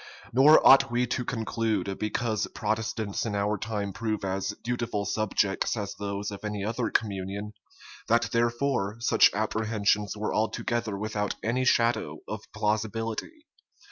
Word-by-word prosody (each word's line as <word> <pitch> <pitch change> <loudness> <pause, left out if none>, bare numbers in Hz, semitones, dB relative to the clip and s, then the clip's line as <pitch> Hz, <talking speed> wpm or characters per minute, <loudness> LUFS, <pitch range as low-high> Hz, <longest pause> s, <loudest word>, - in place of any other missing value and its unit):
Nor 140 +5 +7
ought 135 0 +8
we 120 +1 +1
to 125 +1 -2
conclude, 110 -5 -2
because 110 0 -1
Protestants 110 -1 -2
in 105 - -2
our 100 +1 +1
time 105 -1 -3
prove 110 -2 -2
as 95 +2 -2
dutiful 120 -4 -2
subjects 100 +1 0
as 100 -2 -3
those 100 0 -4
of 100 - -8
any 105 -1 -3
other 115 +2 -1
communion, 100 0 -2 0.5
that 115 +1 +2
therefore 120 -2 0
such 115 - +5
apprehensions 105 -1 0
were 105 +1 -2
altogether 110 0 -1
without 105 0 -2
any 125 +3 0
shadow 115 -3 +2
of - - -7
plausibility. 110 - -2
110 Hz, 135 wpm, -27 LUFS, 100-115 Hz, 0.5 s, ought